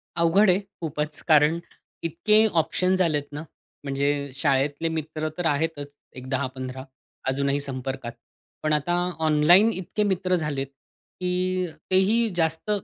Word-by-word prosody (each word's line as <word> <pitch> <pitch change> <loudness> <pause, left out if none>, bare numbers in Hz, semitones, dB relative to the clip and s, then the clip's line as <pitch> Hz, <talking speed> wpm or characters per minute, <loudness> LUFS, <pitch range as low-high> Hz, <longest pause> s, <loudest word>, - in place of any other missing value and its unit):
अवघड 175 +5 +4
आहे 180 - +4 0.2
खूपचं. 150 -1 -4
कारण 155 +1 +5 0.4
इतके 195 +7 +3 0.2
ऑप्शन्स 185 +3 0
झालेत 155 -5 +1
ना, 150 +1 -6 0.4
म्हणजे 140 0 -1
शाळेतले 140 +3 +1
मित्र 155 0 -3
तर 175 - -2
आहेतच 150 -1 0 0.3
एक 130 0 -9
10-15 130 -1 -3 0.4
अजूनही 140 +1 +1
संपर्कात. 130 -3 -4 0.5
पण 155 0 +1
आता 150 +4 0 0.3
ऑनलाईन 160 +7 +5
इतके 190 +2 -2
मित्र 185 -2 +1
झालेत 150 -5 -2 0.5
की 185 0 0 0.3
तेही 215 +5 +3
जास्त 160 +3 -1
155 Hz, 120 wpm, -25 LUFS, 140-180 Hz, 0.5 s, कारण